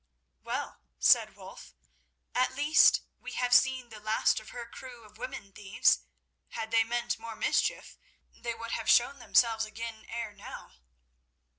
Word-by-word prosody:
"Well," - - -5 0.2
said 65 0 +4
Wulf, - - -12 0.6
"at 250 0 +2
the 260 - -14
least 295 +3 +5 0.2
we - - -8
have 245 0 0
seen 260 -1 +4
the 220 -2 -11
last 215 +1 +1
of 215 - -13
her 240 -1 -7
crew 245 -1 -11
of 215 0 -18
women 220 -5 -7
thieves. 200 +1 +2 0.5
Had 225 -1 -6
they 225 0 +4
meant 240 0 -2
more 225 0 -8
mischief, - - -1 0.3
they 235 -1 -5
would 230 0 -7
have 225 - -2
shown 270 +3 +4
themselves 230 -2 +3
again 220 0 -8
ere 230 -2 -5
now." 200 - -10
230 Hz, 155 wpm, -30 LUFS, 220-245 Hz, 0.6 s, least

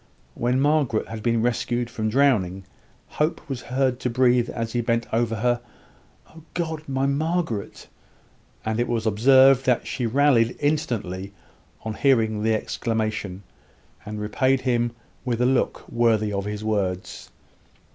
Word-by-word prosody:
When 125 +2 0
Margaret 145 -5 +1
had 110 -1 -6
been 115 0 +1
rescued 120 0 0
from 110 -2 -3
drowning, 105 -8 +2 0.4
Hope 155 +3 -2
was 135 -4 -4
heard 130 0 0
to 125 - -1
breathe, 125 0 +3
as 115 -1 -4
he 120 - +1
bent 115 0 0
over 115 0 +1
her, 120 +2 0 0.7
"Oh 160 - -14
God! 160 -3 -2
my 135 0 0
Margaret!" 145 - -2 0.8
and 110 +1 -1
it 120 - +1
was 115 -2 -1
observed 130 +5 +5
that 125 -2 +2
she 120 - -2
rallied 125 -2 +3
instantly 110 - -2 0.5
on 110 - -2
hearing 110 -4 +2
the 110 0 +2
exclamation, 110 -4 -3 0.6
and 105 0 -6
repaid 130 +5 +1
him 120 -2 +1 0.3
with 120 -2 -2
a 125 - +3
look 130 0 0
worthy 110 -3 +1
of 100 0 -2
his 105 0 -4
words. 95 -4 -2
120 Hz, 145 wpm, -24 LUFS, 110-130 Hz, 0.8 s, observed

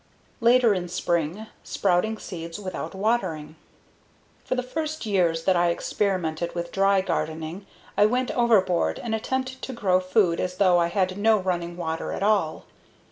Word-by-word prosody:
Later 235 -1 +5
in 180 -2 -3
Spring: 175 +3 -1 0.2
Sprouting 200 +4 0
Seeds 170 -3 -7
Without 190 0 -5
Watering 190 -8 -1 0.9
For - - -2
the 255 - -1
first 310 +2 -4
years 175 -6 +1
that 190 - +3
I 175 0 +3
experimented 170 -2 -1
with 170 0 -4
dry 195 0 +3
gardening 165 +1 -3 0.3
I 205 - +5
went 250 +2 0
overboard 215 -8 +2
and 230 -2 -4
attempted 260 +3 -2
to 265 - -5
grow 190 -6 +2
food 185 -2 +2
as 180 0 -3
though 185 -3 +4
I 170 - +2
had 185 +2 -1
no 220 +1 +4
running 175 -3 -2
water 165 -2 -3
at - - -3
all. 200 -7 +1
190 Hz, 155 wpm, -25 LUFS, 170-220 Hz, 0.9 s, Later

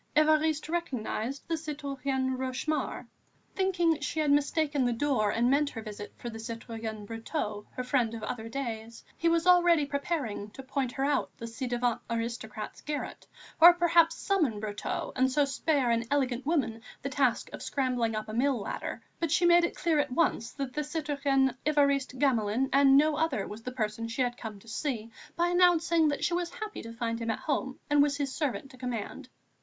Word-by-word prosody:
Évariste 310 0 +3
recognised 275 -6 -3
the 335 - -1
citoyenne 275 -4 -2
Rochemaure. 260 +4 -2 0.5
Thinking 350 -5 +2
she 300 +2 -3
had 300 -2 +2
mistaken 290 0 +2
the 245 -1 +2
door 235 -4 +1
and 235 +3 +2
meant 285 +1 +3
her 225 - -7
visit 205 -1 -7
for - - -7
the 225 - -8
citoyen 225 -1 -6
Brotteaux, 220 -1 -4
her 255 - -3
friend 250 -3 +1
of 225 - -7
other 230 -1 -4
days, 230 -3 -5
he 335 - +1
was 335 0 +2
already 350 -4 +5
preparing 280 -7 -3
to 270 - -9
point 260 -2 -2
her 270 - -1
out 290 0 +1
the 230 - -6
ci 230 +3 -5
devant 245 -1 0
aristocrat's 230 -2 -4
garret 295 -1 -5 0.3
or 345 +1 +10
perhaps 335 -1 +4
summon 315 - 0
Brotteaux 205 -1 -4
and 260 +1 +2
so 290 +2 +3
spare 275 -2 +1
an 230 0 +2
elegant 265 -2 0
woman 265 -9 0 0.2
the 275 - -2
task 260 -3 +1
of - - -7
scrambling 250 -5 0
up 215 - -3
a 215 - -6
mill 260 +3 +2
ladder; 200 - -5 0.2
but 330 - 0
she 345 +3 +3
made 345 0 +6
it 340 - -1
clear 325 -3 +1
at 290 - +1
once 250 -6 +1
that 275 -3 -4
the 300 - -1
citoyen 285 -3 0
Évariste 280 -3 +2
Gamelin 250 -2 +1
and 275 0 +6
no 300 +1 +4
other 300 -11 0
was 210 +2 -8
the 255 - -5
person 230 -2 -2
she 230 +3 0
had 245 -1 -1
come 220 -4 -7
to 230 - -19
see 230 -2 -3 0.2
by 345 +1 +2
announcing 340 -2 +4
that 290 -1 -1
she 350 - +1
was 350 0 0
happy 430 -3 -5
to 230 - -8
find 230 0 -2
him 230 -1 -3
at 225 - 0
home 265 -3 -2
and 290 0 +4
was 285 -1 +2
his 280 -3 -2
servant 275 -3 -2
to 255 - -14
command. 245 -4 -5
270 Hz, 190 wpm, -29 LUFS, 230-305 Hz, 0.5 s, or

